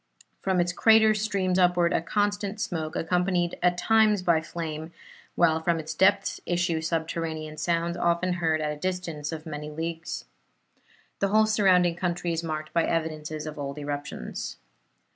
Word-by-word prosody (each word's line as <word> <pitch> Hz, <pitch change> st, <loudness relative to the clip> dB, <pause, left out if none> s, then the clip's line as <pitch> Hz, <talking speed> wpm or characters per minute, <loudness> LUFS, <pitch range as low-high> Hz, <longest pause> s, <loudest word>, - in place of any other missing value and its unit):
From 190 Hz, -2 st, +1 dB
its 175 Hz, 0 st, +1 dB
crater 220 Hz, +3 st, +5 dB
streams 200 Hz, -4 st, 0 dB
upward 175 Hz, -1 st, +3 dB
a -, -, +2 dB
constant 205 Hz, +3 st, -1 dB
smoke, 160 Hz, -5 st, -3 dB
accompanied 180 Hz, +1 st, 0 dB
at 180 Hz, 0 st, +3 dB
times 215 Hz, -1 st, +3 dB
by 170 Hz, -3 st, +3 dB
flame, 160 Hz, -1 st, -5 dB, 0.4 s
while 160 Hz, -2 st, +3 dB
from 165 Hz, +1 st, +1 dB
its 155 Hz, 0 st, -5 dB
depths 195 Hz, +1 st, +2 dB
issue 175 Hz, -2 st, 0 dB
subterranean 160 Hz, -1 st, -3 dB
sounds, 170 Hz, +2 st, 0 dB
often 175 Hz, +1 st, +1 dB
heard 160 Hz, -1 st, +1 dB
at 150 Hz, -1 st, -1 dB
a 150 Hz, -, -10 dB
distance 170 Hz, -5 st, -3 dB
of 160 Hz, 0 st, -6 dB
many 150 Hz, -1 st, -6 dB
leagues. 165 Hz, +2 st, -5 dB, 0.9 s
The 200 Hz, -, +2 dB
whole 215 Hz, +2 st, +4 dB
surrounding 185 Hz, -5 st, +3 dB
country 175 Hz, -1 st, -1 dB
is 165 Hz, +1 st, -2 dB
marked 155 Hz, -1 st, -4 dB
by 170 Hz, -, +3 dB
evidences 155 Hz, -2 st, -2 dB
of 155 Hz, -1 st, -7 dB
old 140 Hz, 0 st, -4 dB
eruptions. 145 Hz, -1 st, -5 dB
170 Hz, 155 wpm, -27 LUFS, 160-185 Hz, 0.9 s, crater